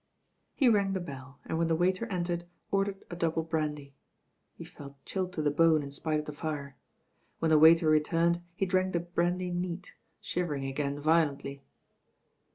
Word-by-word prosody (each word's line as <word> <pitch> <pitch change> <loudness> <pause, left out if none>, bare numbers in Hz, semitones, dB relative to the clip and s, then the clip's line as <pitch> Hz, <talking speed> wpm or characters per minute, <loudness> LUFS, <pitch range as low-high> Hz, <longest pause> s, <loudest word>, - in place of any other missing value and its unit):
He 270 - +3
rang 200 -4 +3
the 190 - -1
bell, 140 -5 -9
and 160 - -2
when 165 - +2
the 165 - +2
waiter 185 +6 +1
entered, 175 -3 -2 0.3
ordered 195 0 -1
a - - -4
double 165 -1 0
brandy. 150 -3 -3 0.6
He - - -9
felt 140 -1 -11
chilled 185 -2 -2
to 155 - -2
the 145 - +2
bone 160 0 +4
in 140 - -7
spite 155 +2 -1
of 150 - -3
the 150 - -5
fire. 145 -2 -5 0.6
When 165 -1 0
the 155 - +6
waiter 160 +1 +7
returned 165 +3 +2
he 195 - 0
dtzvk 185 0 +1
the 170 - +2
brandy 175 +1 -1
neat, 175 +1 -4 0.3
shivering 150 -6 -2
again 140 +1 -2
violently. 145 -3 +1
165 Hz, 170 wpm, -30 LUFS, 150-180 Hz, 0.6 s, waiter